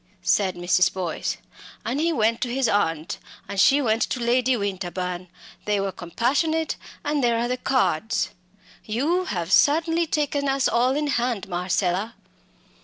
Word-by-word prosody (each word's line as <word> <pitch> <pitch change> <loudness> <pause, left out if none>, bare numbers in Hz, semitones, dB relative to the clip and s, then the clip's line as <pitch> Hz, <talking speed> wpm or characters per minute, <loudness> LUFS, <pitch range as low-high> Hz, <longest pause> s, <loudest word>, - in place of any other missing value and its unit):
said 190 -3 +2
Mrs. 175 +1 +3
Boyce. 180 -3 -3 0.5
"And 260 +5 -1
he 335 +2 +2
went 230 -5 +1
to 245 - -1
his 260 0 +1
aunt 165 -4 0 0.3
and 200 - -4
she 280 +7 +5
went 225 -1 +1
to - - 0
Lady 245 +1 +2
Winterbourne 180 -3 -3 0.4
they 210 -1 +1
were 195 0 -1
compassionate 275 - 0 0.3
and 295 -2 0
there 235 -1 +3
are 235 +1 0
the 250 - 0
cards. 220 -6 0 0.5
You 305 +12 0
have 175 - -3
certainly 325 +3 +4
taken 285 -2 0
us 270 0 +2
all 250 +3 +2
in 300 +1 0
hand, 240 -8 -1
Marcella!" 185 +3 -1
235 Hz, 150 wpm, -24 LUFS, 190-275 Hz, 0.5 s, she